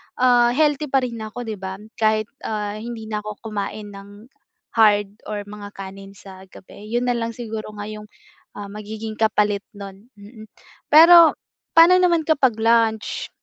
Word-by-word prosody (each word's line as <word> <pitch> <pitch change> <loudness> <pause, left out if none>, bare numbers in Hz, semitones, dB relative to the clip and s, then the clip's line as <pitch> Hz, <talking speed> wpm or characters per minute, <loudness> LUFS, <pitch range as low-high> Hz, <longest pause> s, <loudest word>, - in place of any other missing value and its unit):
ah 245 -1 +4
healthy 300 -1 +1
pa 265 -1 +1
rin 235 -2 -5
na 220 - -6
ako 245 +3 -7
'di 215 -4 -6
ba? 190 0 -6 0.2
kahit 215 0 +1 0.2
ah, 210 -1 -4
hindi 230 0 -7
na 210 -1 -2
ako 210 +1 -8
kumain 210 0 -5
ng 205 +4 -14 0.4
hard 205 -3 +3 0.2
or 205 -1 -5
mga 205 0 -10
kanin 195 0 -10
sa 190 -1 -14
gabi. 205 +3 -14
Yun 240 +2 -1
na 245 - +1
lang 230 -1 -2
siguro 225 -2 -7
nga 205 - -6
yung 210 0 -9 0.6
magiging 215 +1 -7
kapalit 210 -2 +1 0.2
nun 200 +3 -11
hmm. 215 +2 -13 0.4
Pero 330 +1 +8 0.4
pa'no 345 +3 +8
naman 345 -3 +3
kapag 280 -6 +2
lunch? 225 -1 +1
215 Hz, 160 wpm, -21 LUFS, 205-240 Hz, 0.6 s, Pero